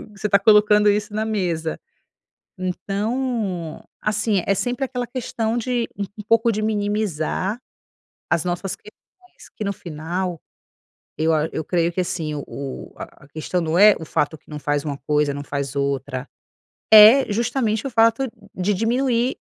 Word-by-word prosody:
você 210 +1 -3
tá 200 - +5
colocando 210 0 +5
isso 210 +1 0
na 215 +1 -1
mesa". 175 -7 -2 0.8
Então, 200 -1 -2 0.2
assim 210 -2 +1
é 195 - +3
sempre 245 +6 -1
aquela 250 -2 -3
questão 235 -2 -2
de 240 0 -1
um 200 - -1
um - - -5
pouco 230 +1 +4
de 215 0 -2
minimizar 205 -2 -1 0.7
as 170 -2 +2
nossas 180 +1 -2
questões, 375 -3 -19
que 215 - -4
no 200 - -1
final 175 0 -4 0.8
eu 160 +1 +2
a 155 0 +1
eu - - -2
creio 170 0 +1
que 185 - -3
assim 165 -4 -3
o 145 - -4
o 140 -2 -7
a - - -11
a - - -19
questão 155 +4 -2
não 165 0 0
é 210 +1 +9
o 160 - -7
fato 150 +1 -1
que - - -27
não 150 -1 -6
faz 145 0 -1
uma 145 -2 -3
coisa, 150 -1 +2
não 145 0 -5
faz 140 -1 -4
outra, 140 -1 -2 0.7
é 220 +4 +9
justamente 230 -1 0
o - - -6
fato 230 +3 +3
de 225 - -13 0.3
de 205 +3 +2
diminuir 240 +3 +1
200 Hz, 165 wpm, -22 LUFS, 160-225 Hz, 0.8 s, é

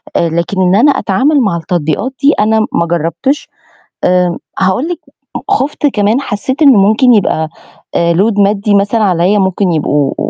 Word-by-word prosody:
آآ 170 - +1
لكن 170 +4 -2
إن 185 0 +2
أنا 270 +8 +4
أتعامل 270 +5 +1
مع 195 -7 0
التطبيقات 165 - -2
دي 285 +2 +4
أنا 220 +1 +2
ما 170 - +1
جربتش. 170 - -2 0.6
آآ 180 -1 +1 0.2
هاقول 190 - 0
لِك 350 - -5 0.5
خُفت 295 -6 0
كمان 220 -1 +1
حسيت 260 +5 -3
إنه 270 -8 +6
ممكن 220 +5 +3
يبقى 160 -6 0 0.6
load 205 +4 +1
مادي 200 +1 +1
مثلًا 205 +3 +1
عليّا، 185 +2 +1
ممكن 190 -1 0
يبقوا 145 -3 0
200 Hz, 150 wpm, -12 LUFS, 175-250 Hz, 0.6 s, إنه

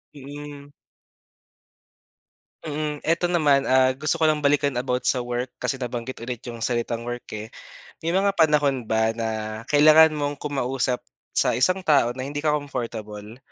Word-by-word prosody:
Mm. 145 +1 -10 1.9
Mm. 150 -1 -4
Ito 170 +2 +1
naman, 150 -6 +2
ah, 130 0 +4
gusto 140 +3 -1
ko - - -2
lang 155 -1 +3
balikan 145 0 +2
about 125 0 -2
sa 130 - +2
work, 125 +1 -3
kasi 125 +2 -1
nabanggit 125 -1 -5
ulit 120 -1 -5
yung 115 -1 -6
salitang 120 -1 -1
work, 120 0 -6
eh. 110 +1 -7 0.5
May 165 - -1
mga 195 +2 +2
panahon 150 -6 +2
ba 110 0 0
na 110 -1 -4
kailangan 155 +2 +7
mong 145 -1 -2
kumausap 135 -3 -1 0.3
sa - - +2
isang 185 +9 +1
tao 140 -6 +4
na 130 - -3
hindi 145 +1 -5
ka 155 - +2
comfortable 115 -6 -5
135 Hz, 150 wpm, -24 LUFS, 120-150 Hz, 1.9 s, kailangan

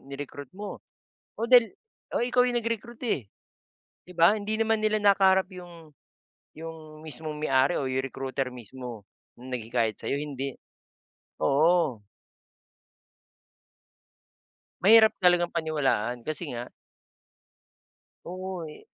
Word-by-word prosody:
in - - -23
ni-recruit 140 0 -7
mo. 205 0 -7 0.6
O 230 - -2
dahil 245 -3 +6 0.4
oh, 240 - +2
ikaw 250 0 +3
yung 245 - -1
nag-recruit, 230 +1 -4
eh. 135 - -1 0.8
Di 180 - -13
ba, 170 +6 +6
hindi 215 +1 -2
naman 225 -1 +2
nila 215 0 +2
nakaharap 190 -2 +4
yung 170 -3 -12 0.6
yung 155 -1 -9
mismong 155 0 -6
may-ari 135 +1 +2
o 135 - -2
yung 130 0 0
recruiter 135 0 -3
mismo. 120 -3 -9 0.3
Yung 130 +1 -10
naghikayat 115 -2 -1
sa'yo, 140 - -2
hindi. 140 -2 -5 0.8
Oo. 145 -5 +3 2.8
Mahirap 220 +3 +7
talagang 175 -1 +4
paniwalaan, 135 -8 -1
kasi 155 -3 -4
nga 120 +1 -6 1.6
Oo, 185 -1 -5
eh - - -14
155 Hz, 115 wpm, -27 LUFS, 130-195 Hz, 2.8 s, Mahirap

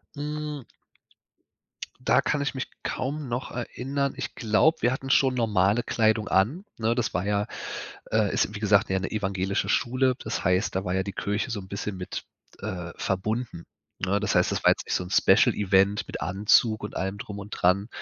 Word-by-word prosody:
Hm 150 -1 -4 1.4
Da 125 +1 +3
kann 150 0 0
ich 140 - -1
mich 130 - -3 0.2
kaum 140 +3 -3
noch 120 +2 -3
erinnern. 135 +3 -2
Ich - - -5
glaube, 135 +8 +3
wir 120 - +3
hatten 135 +1 -4
schon 130 -1 +4
normale 105 -1 +2
Kleidung 110 -1 +1
an, 125 - +1
ne? 115 +1 +1
Das 120 -2 -1
war 90 +2 -1
ja 105 0 0 0.6
äh, 110 -3 +2
ist 105 - 0
wie - - -4
gesagt 105 -1 +3
ja 95 - +2
'ne 95 - -4
evangelische 95 -2 -1
Schule. 130 +1 +2
Das - - -4
heißt, 90 +3 +1
da 95 - -1
war 90 -1 -1
ja 95 - +1
die 100 0 -5
Kirche 105 +7 -2
so 110 -3 -2
'n 95 - -12
bisschen 100 0 -4
mit, 90 0 -6 0.4
äh, 90 -5 -5
verbunden. 105 -1 -2 0.4
Ne, 95 +2 +1
das 105 -1 0
heißt, - - +3
das - - -2
war - - +7
jetzt - - 0
nicht - - 0
so'n 90 +1 -4
Special 110 +4 +5
Event 100 0 +2
mit - - -6
Anzug 105 +3 +3
und 105 - -7
allem 95 +2 -2
drum 100 0 -7
und 100 +1 -9
dran, 100 +3 +2
105 Hz, 195 wpm, -26 LUFS, 95-125 Hz, 1.4 s, war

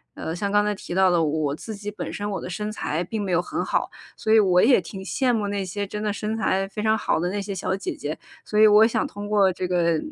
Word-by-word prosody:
呃， 160 - -4
像 200 +3 -2
刚 205 0 +4
才 210 0 0
提 190 - -7
到 190 0 +5
的 175 -1 +3
我 150 -2 0
自 220 +7 -7
己 205 +1 -6
本 210 - -6
身， 205 0 -4
我 200 - -3
的 - - -6
身 210 +4 -4
材 170 -5 -2
并 215 +4 -4
没 195 -2 -3
有 175 - +3
很 180 - -3
好。 - - 0 0.3
所 220 - -2
以 220 - +7
我 180 -3 +4
也 250 -1 +6
挺 190 +3 -8
羡 250 +6 0
慕 215 -3 0
那 200 -1 -2
些 200 +2 -3
真 210 +1 -5
的 210 -1 0
身 210 +1 -3
材 195 -3 +1
非 205 +2 -6
常 220 0 +3
好 205 - 0
的 175 +2 -1
那 205 +2 -2
些 200 0 -5
小 185 0 -1
姐 195 - -4
姐， 150 +2 -5 0.3
所 210 - -3
以 215 - +8
我 210 +1 +7
想 - - 0
通 205 0 -7
过 205 -2 +3
这 180 0 -3
个， 170 -2 +2
200 Hz, 305 characters per minute, -24 LUFS, 180-210 Hz, 0.3 s, 以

